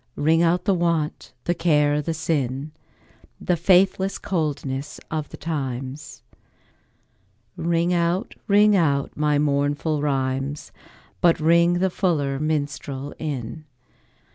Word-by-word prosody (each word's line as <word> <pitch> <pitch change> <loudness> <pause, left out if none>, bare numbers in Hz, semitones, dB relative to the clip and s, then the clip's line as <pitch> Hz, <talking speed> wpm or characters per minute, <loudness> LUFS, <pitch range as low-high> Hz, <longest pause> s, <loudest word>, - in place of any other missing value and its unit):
Ring 160 +3 +3
out 170 +1 +2
the 200 - +3
want, 170 -4 -1
the 175 - +1
care 150 -3 +2
the 160 +2 -3
sin, 145 -3 -2 0.7
The 180 - +1
faithless 190 +2 +3
coldness 145 -7 -3
of 155 -2 -3
the - - -10
times; 135 -2 -5 1.3
Ring 170 +1 0
out, 175 +5 0
ring 210 0 +5
out 145 -6 +1
my 150 -1 +1
mournful 145 +1 0
rhymes, 135 - -2 0.5
But 170 -1 +4
ring 170 +2 +4
the 185 +1 +1
fuller 145 -8 0
minstrel 145 -2 -3
in. 150 0 -5
155 Hz, 115 wpm, -23 LUFS, 140-170 Hz, 1.3 s, ring